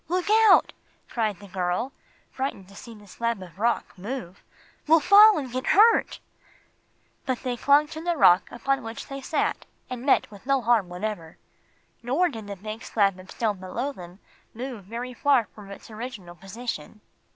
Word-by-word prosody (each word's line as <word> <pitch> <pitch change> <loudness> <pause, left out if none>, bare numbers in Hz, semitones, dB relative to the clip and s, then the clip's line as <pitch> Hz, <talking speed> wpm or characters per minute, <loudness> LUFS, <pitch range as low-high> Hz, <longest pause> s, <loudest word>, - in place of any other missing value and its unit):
"Look 365 +4 -1 0.2
out!" 385 - +5 0.4
cried 215 -5 -1
the 200 - -13
girl, 185 +7 -2 0.4
frightened 260 -8 -4
to 200 - -15
see 230 +2 -11
the 210 -1 -16
slab 230 +2 -3
of 180 0 -14
rock 235 +2 0
move. 200 -2 -7 0.5
"We'll 325 +2 +6
fall 410 +5 +7
and 265 -5 -4
get 255 +2 -4
hurt!" 450 +2 +5 1.1
But 255 -2 -2
they 250 -2 -2
clung 285 +4 +4
to 315 0 -7
the 345 0 -1
rock 180 -7 +5
upon 270 +2 -1
which 225 -1 -7
they 275 0 -6
sat 305 - -2 0.2
and 250 -1 -5
met 270 -5 +2
with 205 +4 -14
no 275 -1 +3
harm 225 -5 +2
whatever. 180 -3 -5 0.6
Nor 280 +10 +1
did 225 -7 -8
the 200 - -6
big 215 +4 -7
slab 195 -4 +1
of 185 +1 -14
stone 210 -4 -2
below 230 +9 -4
them 180 -7 -12 0.4
move 240 -4 -7
very 240 +5 -6
far 265 -2 +2
from 205 -2 -13
its 200 +3 -11
original 215 -6 -8
position. 210 -1 -7
230 Hz, 175 wpm, -25 LUFS, 195-270 Hz, 1.1 s, fall